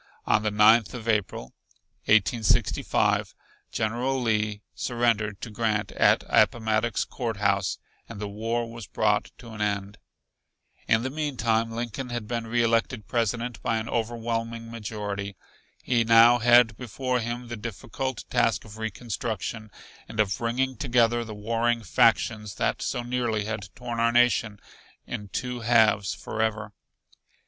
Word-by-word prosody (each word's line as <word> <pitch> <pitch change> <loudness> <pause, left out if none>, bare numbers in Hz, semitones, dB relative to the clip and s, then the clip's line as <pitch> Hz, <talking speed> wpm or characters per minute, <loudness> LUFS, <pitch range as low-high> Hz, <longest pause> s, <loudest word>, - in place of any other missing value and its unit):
On 110 - +3
the 110 - 0
Ninth 110 +3 +5
of 115 -2 -8
April, 100 - -1 0.5
1865, 110 +1 +2 0.4
General 120 +5 -1
Lee 105 -3 0
surrendered 115 -4 0
to 115 - -6
Grant 110 -1 -1
at - - +3
Appomattox 110 -1 +2
Court 115 -4 -4
House 100 -1 +1 0.3
and 115 -3 -8
the 105 - -3
war 115 +3 -2
was 115 -2 -9
brought 105 -1 +1
to 115 - -12
an 105 -1 -7
end. 100 -1 -2 0.9
In 110 +1 +3
the 130 - -2
meantime 120 -7 0
Lincoln 120 +2 -5
had 120 -3 -4
been 115 -1 -3
reelected 115 -1 +1
President 115 -1 -1
by 115 - 0
an 110 0 -4
overwhelming 115 0 -3
majority. 105 -3 -5 0.5
He 120 -2 +2
now 115 +1 +7
had 120 -1 +5
before 125 +1 -2
him 120 +1 -4
the 120 - -5
difficult 115 +4 -5
task 115 -3 +1
of 110 0 -12
reconstruction, 110 0 -4 0.4
and 110 - -8
of 100 -2 +2
bringing 125 +2 -1
together 120 -2 +2
the 110 -2 -8
warring 115 +2 0
factions 105 +3 +2
that - - -1
so 125 -3 -2
nearly 120 -4 -1
had 105 -3 -5
torn 120 -2 -5
our 115 0 +3
nation 120 -3 +2 0.5
in 105 -4 -6
two 125 +4 -4
halves 110 -4 +3
forever. 110 -1 -3
115 Hz, 140 wpm, -26 LUFS, 105-120 Hz, 0.9 s, now